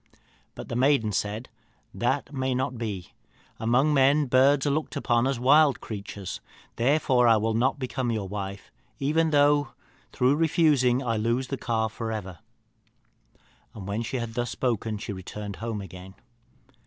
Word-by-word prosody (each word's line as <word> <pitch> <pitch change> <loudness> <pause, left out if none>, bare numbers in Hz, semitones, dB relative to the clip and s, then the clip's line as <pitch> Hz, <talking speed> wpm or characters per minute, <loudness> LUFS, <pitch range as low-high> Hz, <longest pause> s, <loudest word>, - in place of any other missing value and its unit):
But - - -8
the - - -5
maiden 125 -4 +2
said, 105 +4 -2 0.5
'That 135 +4 -1
may 130 -1 -1
not 130 0 -1
be; 105 -6 -5 0.5
among 125 +7 +2
men 140 +2 +4
birds 135 +2 +4
are 145 - +2
looked 155 +2 -2
upon 120 +1 +1
but - - +2
as 135 -3 -2
wild 140 +2 +5
creatures. 100 -2 -7 0.3
Therefore 130 -1 +3
I 115 -1 +6
will 110 +1 0
not 130 +6 +1
become 130 -2 -3
your 105 -4 -2
wife, 100 0 -6 0.3
even 160 +4 +1
though, 145 -2 +3 0.4
through 130 +3 +2
refusing, 150 -6 +3
I 115 -2 -1
lose 120 +4 -1
the 135 - -1
calf 110 -3 -1
for 115 -1 -4
ever.' 95 -6 -6 1.4
And 100 -3 -8
when 100 +3 -2
she 115 +3 -3
had 115 -2 -4
thus 120 0 -2
spoken 115 -4 -2
she 105 0 -5
returned 100 +2 -7
home 115 -2 -4
again. 95 0 -11
120 Hz, 160 wpm, -26 LUFS, 110-135 Hz, 1.4 s, I